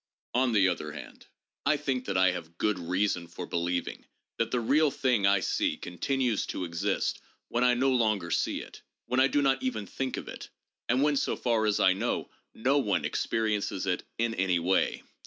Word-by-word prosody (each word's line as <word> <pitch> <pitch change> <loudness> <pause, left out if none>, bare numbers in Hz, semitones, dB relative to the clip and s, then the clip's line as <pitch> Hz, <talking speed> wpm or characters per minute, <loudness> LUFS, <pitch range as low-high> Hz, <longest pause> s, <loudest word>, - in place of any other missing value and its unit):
On 125 0 +2
the 100 -4 +4
other 75 -4 -2
hand, - - -11 0.4
I 150 +1 +3
think 135 -3 -2
that 95 -2 -1
I 95 0 +5
have 85 -1 -7
good 105 -3 0
reason 90 0 0
for - - -7
believing 85 +1 -2 0.3
that 115 - 0
the 125 - 0
real 145 +6 +3
thing 125 -7 +1
I 100 -1 +4
see - - 0
continues 120 +5 -1
to - - -3
exist 85 -1 -1 0.3
when 120 +1 +1
I 125 0 +4
no 135 +2 +2
longer 110 -8 +1
see - - 0
it, - - -12 0.2
when 125 - 0
I 135 - +6
do 145 +1 +1
not 135 -1 +2
even 110 -5 -2
think 130 +6 -3
of - - -6
it, - - -8 0.4
and 125 +3 +3
when 150 -1 +3
so - - 0
far 115 -3 +1
as 105 - +1
I 95 - +5
know 95 - -2 0.2
no 135 +5 +2
one 95 - 0
experiences 105 0 -1
it 90 -2 0 0.2
in 115 0 0
any 95 -3 +1
way. 90 +3 +1
110 Hz, 195 wpm, -29 LUFS, 95-130 Hz, 0.4 s, I